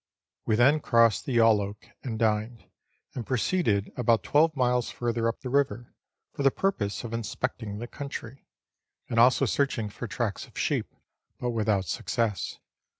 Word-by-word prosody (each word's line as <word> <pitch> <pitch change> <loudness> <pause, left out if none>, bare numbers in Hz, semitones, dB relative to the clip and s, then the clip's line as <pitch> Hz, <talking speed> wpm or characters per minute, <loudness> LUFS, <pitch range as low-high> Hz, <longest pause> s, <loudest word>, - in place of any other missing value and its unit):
We 110 - +3
then 135 +7 +5
crossed 115 -6 +3
the 125 -3 +1
Yalloak 105 -3 +2
and 115 -4 -4
dined, 110 +1 0 0.5
and 125 - -4
proceeded 115 - 0
about 115 -2 +2
twelve 155 +1 +3
miles 125 -2 +1
further 115 -1 -1
up 115 - -3
the 125 - -5
river, 135 -4 0 0.4
for - - -5
the 135 - +5
purpose 125 - -1
of 115 -1 -6
inspecting 115 -2 -3
the 115 - -5
country, 135 -1 -8 0.6
and 115 - +1
also 125 +3 +5
searching 120 -3 0
for 120 - -6
tracks 110 -2 -3
of - - -17
sheep, - - -1 0.5
but 125 - -1
without 105 -4 +1
success. 105 +3 -2
115 Hz, 150 wpm, -27 LUFS, 110-130 Hz, 0.6 s, then